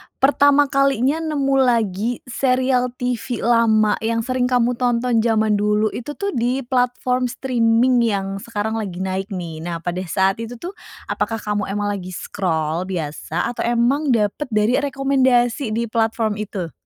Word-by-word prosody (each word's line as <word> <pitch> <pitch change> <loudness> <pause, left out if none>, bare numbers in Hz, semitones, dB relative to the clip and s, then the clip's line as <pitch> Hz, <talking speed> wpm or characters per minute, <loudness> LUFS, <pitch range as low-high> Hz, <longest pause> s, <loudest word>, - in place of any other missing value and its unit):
pertama 285 +1 +4
kalinya 275 +2 +2
nemu 285 -4 0
lagi 230 -2 +1
serial 255 0 +1
TV 245 0 -3
lama 220 -2 +3
yang 230 +1 -1
sering 255 +1 0
kamu 245 -1 +2
tonton 245 -1 +1
zaman 220 -2 +2
dulu 210 +1 +1
itu 290 +5 -6
tuh 400 0 -2
di 250 +2 -1
platform 250 0 0
streaming 245 0 +2
yang 195 -4 -1
sekarang 220 +1 -3
lagi 190 -3 -4
naik 190 +1 -2
nih? 165 -3 -6
Nah 170 0 -5
pada 175 +1 -2
saat 190 +4 +1
itu 230 +1 -6
tuh 345 +10 -7 0.4
apakah 225 - -1
kamu 210 -1 -2
emang 205 +1 -2
lagi 185 -2 -6
scroll 165 -2 -2
biasa 165 +1 -3
atau 245 - -12
emang 245 +4 +2
dapet 215 +7 -1
dari 220 +2 +2
rekomendasi 260 -4 +1
di 230 -1 -2
platform 225 -2 0
itu? 190 -5 -4
230 Hz, 150 wpm, -20 LUFS, 205-255 Hz, 0.4 s, pertama